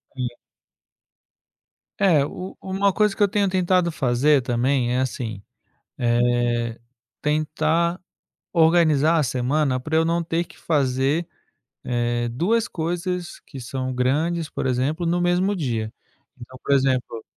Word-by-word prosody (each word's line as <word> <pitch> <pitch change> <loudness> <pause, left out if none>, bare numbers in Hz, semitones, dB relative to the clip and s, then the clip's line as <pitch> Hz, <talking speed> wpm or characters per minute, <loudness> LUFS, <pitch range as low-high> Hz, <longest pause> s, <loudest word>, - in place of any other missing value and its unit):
Sim. 125 -2 -4 1.6
É 175 -8 +4
u 180 +6 -6
uma 195 +1 0
coisa 210 -2 +2
que 210 - +2
eu - - +5
tenho 200 0 +1
tentado 185 -1 +2
fazer, 135 0 +2
também 125 0 +1
é 125 - +1
assim, 120 -5 -3 0.6
eh, 120 -1 +1 0.4
tentar 155 +3 0 0.5
organizar 160 -2 +4
a - - +2
semana, 130 +2 0
para 155 +5 -3
eu 160 - +4
não 170 +1 0
ter 165 +1 -1
que - - -18
fazer, 140 +2 0 0.6
eh, 120 -1 -1
2 215 - 0
coisas 175 +1 -3
que 135 - -10
são 130 +1 -4
grandes, 150 +6 0
por - - -3
exemplo, 135 +7 0
no 175 +1 +1
mesmo 180 +3 +1
dia. 115 -8 -2 0.5
Então, 130 +1 -12
por 140 - +2
exemplo 130 -4 0
150 Hz, 130 wpm, -23 LUFS, 125-170 Hz, 1.6 s, eu